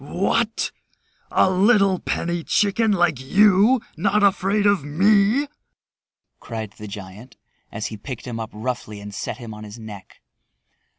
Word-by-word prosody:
"What, 200 +8 -1 0.6
a - - +3
little 195 -1 +3
penny 170 0 -2
chicken 210 +4 +2
like 175 -8 +2
you 205 - +4
not 200 +5 +1
afraid 200 +1 +2
of 200 -7 +3
me!" 200 - +3 0.9
cried 110 -3 -6
the 105 - -7
giant 100 +4 -10 0.3
as 110 -2 -5
he - - -6
picked 120 +3 -8
him 120 -3 -5
up 110 -1 -5
roughly 110 -2 -5
and 100 0 -9
set - - -5
him 115 -4 -8
on 105 0 -10
his 105 +1 -10
neck. 105 -4 -11
165 Hz, 140 wpm, -22 LUFS, -, 0.9 s, you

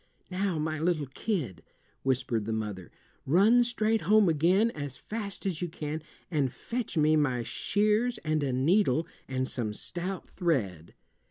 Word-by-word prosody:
"Now, 185 -2 0
my 155 0 -2
little 160 -2 +1
kid," 135 - -3 0.4
whispered 125 -4 0
the 110 - -2
mother, 105 -4 -4 0.4
"run 210 - +5
straight 225 -2 +1
home 215 -3 +5
again 180 +9 +3
as 145 - -6
fast 205 - -5
as 185 -4 -1
you 175 - 0
can, 155 0 -4 0.3
and 140 -6 +1
fetch 235 - -4
me 155 0 +4
my 130 -6 +1
shears 215 - +1
and 155 0 +1
a 140 -2 0
needle 155 +3 +3 0.2
and 130 0 -1
some 110 -5 -3
stout 180 - -5
thread." 100 - -1
155 Hz, 150 wpm, -29 LUFS, 130-200 Hz, 0.4 s, run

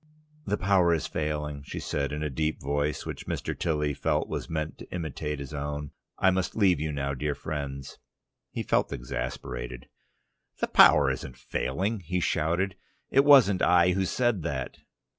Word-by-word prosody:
"The 105 - +1
power 90 -3 +3
is 80 - -3
failing," 75 -1 -3
she 70 - -6
said, 70 -1 -2
in 75 +1 -3
a 75 - -1
deep 75 +4 -1
voice, 70 +2 -1
which - - -6
Mr. - - -3
Tilly 75 -3 0
felt - - 0
was - - -4
meant 80 -1 -3
to - - -11
imitate 75 -3 -3
his 70 +1 -7
own. 75 0 -4 0.3
"I 95 - +4
must 95 0 -1
leave 95 -7 +4
you 75 +1 -2
now, 70 -1 -2
dear 75 +2 -2
friends 70 -3 -5 0.3
" - - -59
He - - -3
felt - - +1
much - - -4
exasperated. 60 -1 -5 0.7
"The - - -1
power - - +7
isn't 60 - -6
failing," 95 - -2
he 90 +1 -2
shouted. 90 +4 0 0.3
"It 135 - +5
wasn't 130 -10 +6
I 90 0 +5
who 95 +1 +1
said 120 -1 +1
that." 70 -5 -4
75 Hz, 175 wpm, -28 LUFS, 70-90 Hz, 0.7 s, power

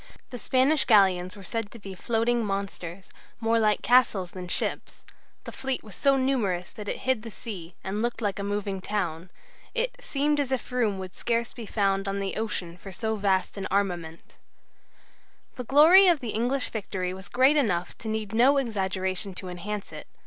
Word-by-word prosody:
The 245 - -6
Spanish 265 +6 +3
galleons 190 -4 +4
were 200 - -10
said 225 +3 -3
to 235 - -11
be 200 -3 -9
floating 230 +4 0
monsters, 195 -3 -5 0.3
more 230 0 +2
like 215 -1 +2
castles 220 -8 +3
than 180 -1 -7
ships; - - -3 0.4
the - - -7
fleet 265 -1 -2
was 215 - -11
so 275 +8 +3
numerous 220 -10 0
that 210 -1 -9
it - - -3
hid 260 -4 +1
the 230 - -8
sea, 190 -6 -8
and 205 +3 -3
looked 240 +1 -1
like 205 -3 -2
a - - -3
moving 200 -1 -2
town; 180 -4 -3 0.5
it - - 0
"seemed 295 - 0
as 275 -2 -1
if 260 -1 -2
room 230 -6 +1
would 185 -1 -7
scarce 235 0 -1
be 230 -3 -8
found 195 -2 0
on 195 0 -1
the 195 -1 -3
ocean 190 -6 -3
for 195 +2 -10
so 220 +4 -2
vast 195 -1 0
an 190 - -3
armament." 175 -5 -3 1.2
The 250 - -6
glory 320 - +8
of 340 -4 +5
the 245 - -5
English 245 +5 0
victory 185 -4 -3
was 190 +1 -9
great 260 +4 +4
enough 180 - 0
to 220 - -7
need 215 -2 -3
no 255 +5 +5
exaggeration 190 -5 -1
to 185 - -5
enhance 200 +3 -5
it. - - -9
210 Hz, 185 wpm, -27 LUFS, 190-245 Hz, 1.2 s, glory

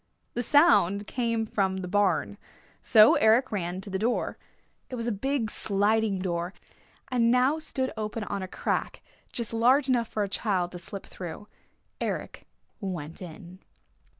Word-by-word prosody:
The 240 - -1
sound 225 - +4
came 230 -1 -1
from 190 -3 0
the 185 -1 -5
barn. 205 +2 +1 0.4
So 215 -1 +7
Eric 230 +4 +4
ran 185 -2 -3
to 200 - -8
the 190 - -1
door. 235 +4 0 0.5
It 255 - -5
was 230 -2 -4
a 240 - 0
big 230 +1 -1
sliding 210 0 +2
door, 175 0 -3 0.6
and 235 -2 +3
now 255 +5 +3
stood 265 -4 -2
open 215 0 -4
on 200 -1 -4
a 185 - -4
crack - - -3 0.3
just 235 -2 -4
large 255 +5 +4
enough 240 -3 +2
for 215 - -2
a - - -1
child 190 -3 -1
to 175 - -7
slip 195 +3 -8
through. 180 +3 -8 0.5
Eric - - -4 0.3
went 175 -6 -5
in. 175 +1 -10
210 Hz, 155 wpm, -27 LUFS, 190-235 Hz, 0.6 s, So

